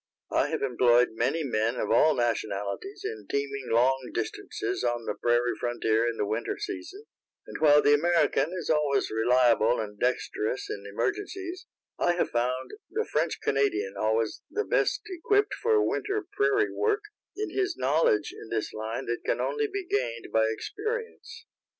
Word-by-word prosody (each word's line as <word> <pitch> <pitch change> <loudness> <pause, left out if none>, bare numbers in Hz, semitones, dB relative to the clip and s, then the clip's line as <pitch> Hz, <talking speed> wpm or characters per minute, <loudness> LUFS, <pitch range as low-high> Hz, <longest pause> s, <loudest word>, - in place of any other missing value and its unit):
I - - +2
have 160 -2 -2
employed 125 -1 +4
many 130 +8 0
men 115 -3 0
of - - -2
all 155 0 +5
nationalities 105 - -2
in 110 -3 -5
teaming 140 -1 -2
long 125 +2 +2
distances 405 -1 -3
on 120 -1 -1
the - - -1
prairie 120 0 +1
frontier 115 -1 +1
in 115 - -5
the 105 - 0
winter 110 +3 -2
season, 390 -1 -6 0.4
and - - -8
while 150 -1 +6
the 145 - +5
American 170 +1 +2
is 180 -3 -2
always 150 -3 +1
reliable 120 0 +3
and 105 -2 -5
dexterous 125 -1 -1
in 100 0 -6
emergencies, 390 - -3 0.3
I 175 - +3
have 175 - -1
found 125 +2 -1 0.2
the 445 +1 -1
French 160 +2 +1
Canadian 110 -8 +1
always 110 0 0
the 430 +1 -2
best - - +1
equipped 410 +2 +1
for 440 -2 +2
winter 415 -2 -1
prairie 410 0 +2
work, 430 0 +1 0.3
in 425 +1 -3
his 390 -2 -1
knowledge 130 -4 +2
in 110 - -11
this 110 -2 -2
line 110 +4 -4
that 120 0 -2
can - - 0
only 440 -1 0
be 395 -2 -4
gained 120 - -2
by 110 0 +4
experience. 455 - -5
135 Hz, 160 wpm, -28 LUFS, -, 0.4 s, while